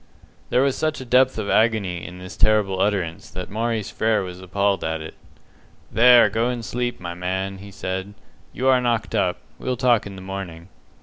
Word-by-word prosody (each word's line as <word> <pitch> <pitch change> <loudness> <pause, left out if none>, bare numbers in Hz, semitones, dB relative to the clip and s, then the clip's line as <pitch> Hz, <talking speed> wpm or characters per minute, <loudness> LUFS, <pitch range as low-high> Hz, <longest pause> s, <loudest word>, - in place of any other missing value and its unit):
There 125 - +3
was 140 -1 +1
such 155 0 -1
a 130 - -7
depth 130 +1 +3
of 110 -2 -3
agony 100 -6 +1
in 90 0 -8
this 90 +1 -9
terrible 100 -3 +2
utterance 95 -6 -1
that 90 0 -7
Maurice 110 -1 -2
Frere 110 -2 +1
was 90 0 -8
appalled 100 +1 0
at 80 0 -2
it. 80 0 -8 0.8
"There, 120 0 +7
go 115 +4 0
and 120 -2 -4
sleep, 120 0 -2
my 85 -1 -5
man," 95 +2 -3
he 100 +1 -10
said. 95 0 -5 0.4
"You 130 - -2
are 130 -1 +5
knocked 115 -7 -1
up. - - +1 0.2
We'll 125 -1 -2
talk 120 -4 +3
in 100 - -9
the 95 - -9
morning." 95 -3 -7
100 Hz, 190 wpm, -23 LUFS, 95-120 Hz, 0.8 s, There